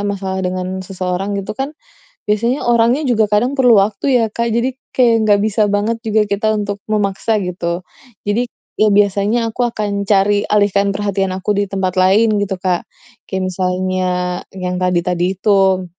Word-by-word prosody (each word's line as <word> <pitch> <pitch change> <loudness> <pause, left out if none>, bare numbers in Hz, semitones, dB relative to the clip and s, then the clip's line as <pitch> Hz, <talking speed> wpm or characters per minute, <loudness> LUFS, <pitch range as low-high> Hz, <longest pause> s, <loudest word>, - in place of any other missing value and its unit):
masalah 195 -2 -3
dengan 185 0 -3
seseorang 185 +1 -3
gitu 195 - -4
kan, 270 +6 -5 0.5
biasanya 235 +6 +1
orangnya 235 +4 +3
juga 225 -3 +3
kadang 245 +7 +1
perlu 250 -3 +5
waktu 205 +3 -2 0.2
ya, - - +2
Kak. 235 +1 -2
Jadi 250 +2 -1 0.2
kayak 230 -3 +3
gak 205 -1 +4
bisa 215 0 +1
banget 205 +3 0
juga 220 0 +2
kita 215 +2 +1
untuk 205 -1 -2
memaksa, 210 +1 0
gitu. 175 -1 -3 0.5
Jadi 220 +4 +1 0.3
e 215 - +3
biasanya 205 +3 +2
aku 245 -1 0
akan 205 -3 -3
cari 205 0 +2
alih 205 -1 +3
perhatian 200 -1 0
aku 205 +2 -1
di 200 -1 -1
tempat 190 -2 -1
lain 205 +3 +3
gitu, 195 -1 -2
Kak, 180 - -2 0.4
kayak 190 -1 -2
misalnya 185 0 -1 0.5
yang 180 -1 -3
tadi-tadi 180 +1 0
itu. 190 -2 +2
200 Hz, 160 wpm, -17 LUFS, 190-220 Hz, 0.5 s, perlu